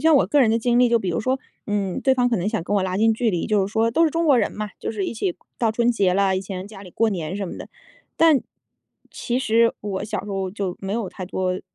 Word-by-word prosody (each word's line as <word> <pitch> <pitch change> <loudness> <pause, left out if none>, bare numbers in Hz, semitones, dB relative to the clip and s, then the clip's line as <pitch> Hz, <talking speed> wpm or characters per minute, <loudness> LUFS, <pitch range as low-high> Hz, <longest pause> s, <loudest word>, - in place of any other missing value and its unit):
像 315 - +6
我 - - +3
个 295 - +3
人 235 -4 +4
的 230 - +2
经 240 +1 +2
历， 250 - +5
就 235 0 +3
比 190 -4 -2
如 165 - -1
说， 260 +4 0 0.3
嗯， 200 -3 -1
对 265 - +3
方 245 -1 +2
可 235 - +1
能 185 +3 -1
想 220 -3 -1
跟 205 - -1
我 195 - +2
拉 185 0 -2
近 225 +1 +3
距 230 0 +1
离， 175 -4 -2
就 210 -2 +2
是 195 - -6
说 225 +1 +2
都 325 +9 +3
是 315 - +2
中 330 +1 0
国 280 -4 +5
人 220 - +1
嘛， 210 -1 -5
就 - - -3
是 210 -3 -3
一 - - -4
起 350 - -2 0.2
到 230 -2 +2
春 235 +2 +2
节 195 -5 +2
了， 190 0 +2
以 - - -1
前 190 -1 -6
家 205 -2 -11
里 185 - -12
过 225 +5 +1
年 180 -2 -3
什 200 -2 -3
么 - - -7
的。 - - -9 0.5
但 320 -5 +5 0.7
其 245 +1 -2
实 230 -2 +3
我 200 -1 -4
小 210 -1 -4
时 210 - -7
候 190 -1 -2
就 190 -2 -4
没 195 0 -4
有 220 -3 -2
太 185 - -7
多， 185 0 -2
215 Hz, 310 characters per minute, -22 LUFS, 190-235 Hz, 0.7 s, 像